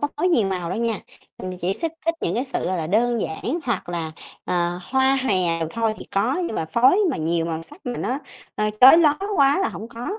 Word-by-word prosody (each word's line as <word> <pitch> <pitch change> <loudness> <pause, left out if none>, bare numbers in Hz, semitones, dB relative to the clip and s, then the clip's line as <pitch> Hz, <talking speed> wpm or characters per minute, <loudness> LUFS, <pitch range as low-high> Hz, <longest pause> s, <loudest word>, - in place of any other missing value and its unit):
có 290 - 0
phối 360 +5 +1
nhiều 230 - +2
màu 180 -3 -3
đâu 185 - -2
nha, 230 -3 0 0.4
mình 185 -1 -6
chỉ 180 +3 0
thích 330 -1 -1
thích 330 - +2
những 170 - -1
cái 245 +4 0
sự, 270 - -3
gọi 185 - -1
là, 160 - -2
đơn 230 +6 +1
giản 240 - -3
hoặc 235 -9 -2
là, 165 -2 -3 0.3
ờ, 175 0 -1
hoa 265 +5 +2
hoè 245 -6 +1 0.4
thôi 225 +1 -1
thì - - -9
có, 215 +7 +1
nhưng 220 - -4
mà - - -1
phối 245 - +4
mà - - -2
nhiều 165 +1 0
màu 165 -1 -3
sắc 165 - -12
mà 245 -1 -3
nó, 260 +3 -2 0.4
à, 210 0 0
chói 265 +6 +10
loá 300 -3 +4 0.2
quá 280 +2 +4
là 385 - +1
hổng 225 - -8
có. 235 +1 -7
225 Hz, 240 wpm, -22 LUFS, 175-265 Hz, 0.4 s, chói